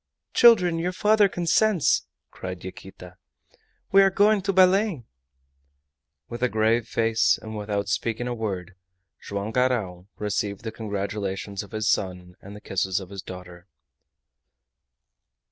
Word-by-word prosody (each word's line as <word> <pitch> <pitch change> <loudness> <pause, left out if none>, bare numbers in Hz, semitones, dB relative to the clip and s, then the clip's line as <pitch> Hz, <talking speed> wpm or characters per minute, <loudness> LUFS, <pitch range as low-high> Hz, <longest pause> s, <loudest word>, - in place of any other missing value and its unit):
"Children! 180 -8 +5
your 180 +2 -2
father 210 +1 +3
consents!" 175 +1 +2 0.2
cried 90 -1 -7
Yaquita. 90 -1 -11 0.7
"We 195 - +7
are 195 - +5
going 205 +2 +3
to 195 +1 0
Belem!" 190 - +3 1.2
With 120 0 -7
a 125 - +2
grave 110 +1 +1
face, 115 -1 +2
and 110 0 -8
without 105 -1 -3
speaking 115 +4 -2
a 125 - -2
word, 100 -5 -4 0.5
Joam 100 +2 -4
Garral 110 -8 -1
received 105 0 -3
the 110 - -4
congratulations 100 -2 -4
of 100 - -11
his 110 0 -2
son 90 -2 -1
and 100 +1 -11
the 105 - -11
kisses 95 -1 -1
of 95 -1 -11
his 100 -1 -6
daughter. 90 -1 -11
110 Hz, 130 wpm, -25 LUFS, -, 1.2 s, We